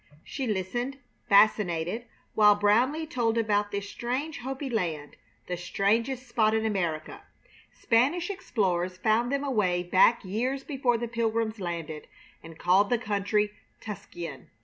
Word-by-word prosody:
She 270 -2 -4
listened, 240 +6 -2 0.3
fascinated, 200 +1 +3 0.3
while 210 -1 +6
Brownleigh 250 +10 +3
told 235 -6 0
about 210 -2 +1
this 200 0 -4
strange 260 +8 -3
Hopi 270 +3 -5
land, 165 - -3 0.3
the 180 - -3
strangest 225 +8 0
spot 220 -2 +2
in 220 0 0
America. 175 -7 -2 0.5
Spanish 285 - +1
explorers 185 - -1
found 225 +5 +1
them 280 0 0
away 200 -10 +1
back 190 +6 +4
years 250 +8 -2
before 260 -5 0
the 235 +1 -3
Pilgrims 225 -1 -1
landed, 165 -4 -5 0.3
and 165 0 -12
called 185 +4 +3
the 245 - +3
country 210 -1 0 0.3
Tuscayan. 175 -8 -8
215 Hz, 130 wpm, -28 LUFS, 185-245 Hz, 0.5 s, while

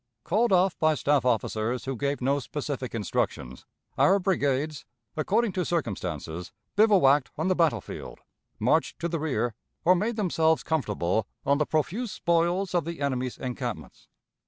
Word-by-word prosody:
Called 215 +5 +1
off 185 0 +4
by 155 -1 +3
staff 145 0 +1
officers, 120 +1 0
who 135 0 -2
gave 140 +3 -2
no 140 +3 +2
specific 140 -2 -4
instructions, 65 - -3 0.3
our 195 - +5
brigades, 150 -6 0 0.3
according 210 +8 +1
to 185 -1 -1
circumstances, 90 - -3 0.2
bivouacked 185 - +5
on 160 +5 0
the 185 - +3
battle 165 -4 +2
field, - - -9 0.4
marched - - +1
to 170 - -2
the 170 -1 -2
rear, 120 -7 -1 0.3
or 180 - +7
made 215 +6 0
themselves 165 -6 +2
comfortable 105 - 0 0.2
on 140 +1 +3
the 150 - +1
profuse 195 - -1
spoils 175 +3 +1
of 175 -2 +2
the 170 +2 -6
enemy's 130 -3 -2
encampments. 125 -2 -6
150 Hz, 150 wpm, -27 LUFS, 125-180 Hz, 0.4 s, or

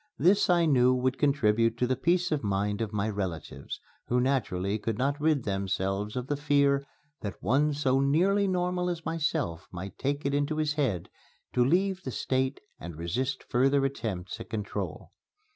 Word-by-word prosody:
This 195 +3 +4
I 175 -1 +4
knew 130 -4 +4
would 130 +1 0
contribute 115 -5 +2
to 125 - +2
the 130 +1 +1
peace 175 +4 +1
of 150 -4 0
mind 100 +1 0
of 110 -2 -2
my 105 0 -1
relatives, 95 -9 -4 0.3
who 125 - +2
naturally 110 -7 0
could 110 0 -2
not 140 +3 0
rid 150 -4 +2
themselves 95 +1 -1
of 125 -1 -2
the 145 - -1
fear 140 -1 +2 0.4
that 100 -3 -5
one 140 +9 +3
so 135 -2 +2
nearly 185 +9 +3
normal 180 -1 0
as 170 -2 -4
myself 155 - -1
might 95 +1 -7
take 140 +2 -1
it 140 - +1
into 145 +2 0
his 155 -1 +1
head 130 - -1 0.4
to 125 - +4
leave 185 +7 +2
the 130 - -5
State 130 +2 -1 0.2
and 85 -2 -7
resist 125 - -2
further 135 +3 +3
attempts 110 -7 -4
at 115 - -9
control. 105 -2 -4
130 Hz, 175 wpm, -28 LUFS, 105-150 Hz, 0.4 s, This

